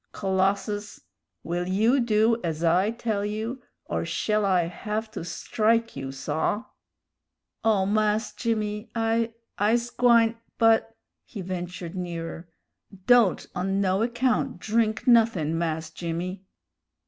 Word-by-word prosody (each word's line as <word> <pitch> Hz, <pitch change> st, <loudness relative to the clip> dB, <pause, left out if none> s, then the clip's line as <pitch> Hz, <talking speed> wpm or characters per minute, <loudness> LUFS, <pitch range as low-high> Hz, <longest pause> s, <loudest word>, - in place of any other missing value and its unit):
"Colossus, 195 Hz, +2 st, -1 dB, 0.4 s
will 175 Hz, +1 st, -2 dB
you 220 Hz, +8 st, +3 dB
do 225 Hz, -1 st, +3 dB
ez 165 Hz, -1 st, -2 dB
I 180 Hz, +5 st, +3 dB
tell 225 Hz, -3 st, -2 dB
you, 220 Hz, +5 st, -3 dB, 0.2 s
or -, -, -2 dB
shell 215 Hz, -1 st, 0 dB
I 185 Hz, -3 st, +3 dB
hev' 215 Hz, +6 st, -4 dB
to -, -, -6 dB
strike 225 Hz, +6 st, 0 dB
you, 135 Hz, -1 st, -5 dB
saw?" 155 Hz, -, -2 dB, 1.0 s
"Oh 210 Hz, -4 st, +3 dB
Mahs 215 Hz, +1 st, +1 dB
Jimmy, 210 Hz, -1 st, -2 dB
I 225 Hz, 0 st, 0 dB, 0.2 s
I's 235 Hz, +4 st, +2 dB
gwine; 235 Hz, -2 st, +4 dB, 0.2 s
but 225 Hz, 0 st, +3 dB, 0.2 s
" -, -, -59 dB
he 205 Hz, -, -7 dB
ventured 180 Hz, -1 st, -5 dB
nearer 170 Hz, -2 st, -5 dB, 0.6 s
"don't 240 Hz, -6 st, +4 dB
on 195 Hz, +2 st, -1 dB
no 190 Hz, 0 st, +1 dB
account 245 Hz, +2 st, 0 dB
drink 220 Hz, +1 st, 0 dB
nothin', 225 Hz, -, +4 dB
Mahs 160 Hz, -1 st, -2 dB
Jimmy." 175 Hz, +4 st, -4 dB
210 Hz, 125 wpm, -26 LUFS, 180-225 Hz, 1.0 s, gwine